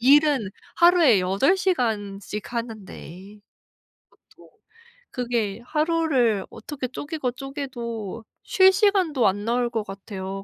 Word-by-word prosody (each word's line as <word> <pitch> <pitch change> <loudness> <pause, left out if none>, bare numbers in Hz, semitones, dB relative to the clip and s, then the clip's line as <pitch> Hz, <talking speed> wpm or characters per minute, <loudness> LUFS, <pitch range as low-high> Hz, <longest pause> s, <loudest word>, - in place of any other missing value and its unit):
일은 275 -4 +4 0.3
하루에 340 - +5
8 195 - +2
시간씩 210 - -2
하는데. 210 -4 -7 0.7
그쵸. - - -22 0.6
그게 235 -5 -2
하루를 300 - +1
어떻게 265 +2 -6
쪼개고 290 0 -4
쪼개도 240 -6 -6 0.2
쉴 380 -1 +5
시간도 375 - +2
안 205 +2 0
나올 240 +1 +1
것 225 -2 -1
같아요. 195 -1 -7
240 Hz, 220 characters per minute, -24 LUFS, 205-295 Hz, 0.7 s, 하루에